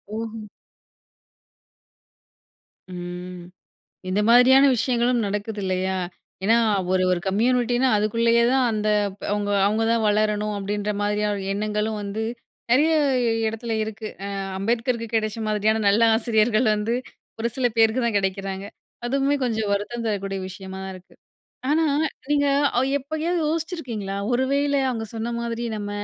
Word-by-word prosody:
ஓஹோ. 225 -1 -5 2.5
ம். 180 0 -7 0.6
இந்த 190 +2 +1
மாதிரியான 255 +3 +7
விஷயங்களும் 240 0 +1
நடக்குது 210 +1 -3
இல்லயா? 185 0 -1 0.5
ஏன்னா, 225 +4 +4 0.3
ஒரு 185 0 +2
ஒரு 180 - +1
கம்யூனிட்டின்னா 245 +5 +2
அதுக்குள்ளேயே 230 +3 +2
தான் 265 -1 +3
அந்த 215 -1 -1 0.3
ப்ப 205 - -16
அவுங்க 205 0 -1
அவுங்க 215 +2 +1
தான் 230 -1 +2
வளரணும் 210 0 +1
அப்டின்ற 205 +1 -2
மாதிரியான 205 -1 0
எண்ணங்களும் 210 +1 -1
வந்து, 205 +2 -3 0.5
நெறையா 310 +6 +4 0.5
எடத்துல 225 +1 -3
இருக்கு. 215 0 -6 0.2
அ - - -4 0.3
அம்பேத்கருக்கு 230 +3 -1
கெடைச்ச 215 0 -1
மாதிரியான 215 +1 +1
நல்ல 200 +3 +4
ஆசிரியர்கள் 220 0 +2
வந்து 210 +2 -1 0.5
ஒரு 230 - 0
சில 260 -2 +2
பேருக்கு 225 +2 +3
தான் 230 -3 0
கெடைக்கிறாங்க. 195 0 -2 0.4
அதுவுமே 275 +3 +1
கொஞ்சம் 220 -4 -1
வருத்தம் 230 +4 -3
தரக்கூடிய 195 -2 -2
விஷயமா 190 0 -8
இருக்கு. 185 0 -14 0.6
ஆனா, 320 +1 +3 0.4
நீங்க 285 -1 +3 0.3
அ - - +4 0.2
எப்பையாவது 315 +5 -2
யோசிச்சிருக்கீங்களா? 280 - -3 0.2
ஒருவேள 280 +3 +1 0.2
அவுங்க 225 -3 -3
சொன்ன 225 +1 -3
மாதிரி 235 0 -3
நம்ம 205 -1 -5
220 Hz, 125 wpm, -23 LUFS, 205-240 Hz, 2.5 s, மாதிரியான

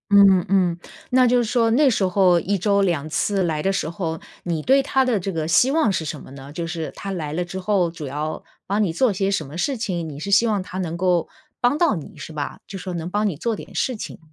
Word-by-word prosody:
嗯 195 -3 +7
嗯， 180 -3 +2 0.3
那 255 0 +5
就 245 0 +4
是 240 - +2
说 230 0 +2
那 275 +4 +5
时 215 -5 +1
候 185 -1 +4
1 200 +4 0
周 200 +2 +2
2 170 -6 0
次 190 +5 0
来 155 -3 -1
的 195 - +2
时 195 -4 -1
候， 165 -2 -3 0.2
你 165 -3 -2
对 270 - +4
她 265 0 +2
的 245 -4 +2
这 195 - -3
个 160 -3 -2
希 205 +11 +4
望 310 -5 +3
是 165 - -1
什 155 -1 -5
么 - - -13
呢？ 135 +1 -10
就 165 +2 -4
是 165 -1 -4
她 200 - -5
来 160 -6 -4
了 175 +3 -2
之 190 +2 -6
后 185 -3 +2
主 165 -3 -7
要 150 +3 -4 0.2
帮 205 +2 +1
你 185 - 0
做 225 +6 +2
些 195 +1 0
什 160 -7 -1
么 150 +4 -9
事 265 +9 0
情， 175 -7 -3
你 145 -1 -8
是 180 - -5
希 200 +4 +5
望 210 -3 +1
她 185 0 -8
能 170 -2 -3
够 175 -2 +1 0.3
帮 245 +4 +3
到 330 -8 +3
你 160 - -8
是 160 - -8
吧， 145 -2 -4
就 195 - -7
是 185 - -8
说 185 - -4
能 170 0 -4
帮 210 +3 0
你 160 - -5
做 230 +7 -1
点 - - -10
事 255 - 0
情。 210 - -7
185 Hz, 275 characters per minute, -22 LUFS, 165-210 Hz, 0.3 s, 嗯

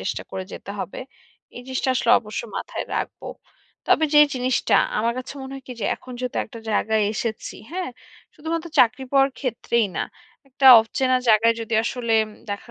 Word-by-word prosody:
চেষ্টা - - -3
করে 190 - -5
যেতে - - -8
হবে। - - -6 0.6
এই 245 - -8
জিনিসটা 260 0 -2
আসলে 240 -2 +1
অবশ্যই 215 +1 -6
মাথায় - - -4
রাখব। - - -3 0.7
তবে 315 - +4
যে 295 - +8
জিনিসটা 255 0 +1 0.2
আমার 230 +2 +1
কাছে 255 - -6
মনে 265 0 -8
হয় 270 - -9
কি - - -5
যে - - -2
এখন 255 - -12
যেহেতু 250 -1 -4
একটা 230 - -11
জায়গায় 220 +1 +1
এসেছি, 220 0 -4 0.2
হ্যাঁ? 360 -5 -4 0.4
শুধুমাত্র 325 +2 -4
চাকরি 250 +2 +4
পাওয়ার 275 0 +4
ক্ষেত্রেই 235 -3 0
না। - - 0 0.5
একটা 265 +1 +1
অচেনা 255 +3 0
জায়গায় 225 +1 +5
যদি 225 0 -3
আসলে 235 -2 -2 0.4
দেখা 205 +4 -6
245 Hz, 170 wpm, -23 LUFS, 225-265 Hz, 0.7 s, যে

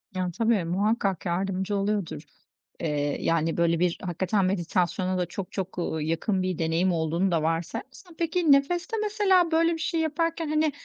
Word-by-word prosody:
Yani 180 -1 -1
tabii, 225 -1 +1
muhakkak 195 +1 0
yardımcı 190 +3 -1
oluyordur. 200 -6 -1 0.6
Iıı, 145 -3 -1
yani, 165 0 +1
böyle, 170 -1 +2
bir 175 -1 +1
hakikaten 185 +2 0
meditasyona 185 0 0
da 180 - 0
çok 180 +2 -6
çok, 190 -2 -5
ııı, 160 -2 -2
yakın 175 +5 0
bir 185 -2 -1
deneyim 165 +3 +1
olduğunu 170 +3 0
da 160 -2 +1
varsayarsan. 255 - -4
Peki 335 -2 +2
nefeste 350 - +2
mesela 385 -5 +3
böyle 330 +1 +3
bir - - -3
şey 330 +1 -1
yaparken, 330 +1 -1
hani, 310 0 +2
190 Hz, 160 wpm, -26 LUFS, -, 0.6 s, mesela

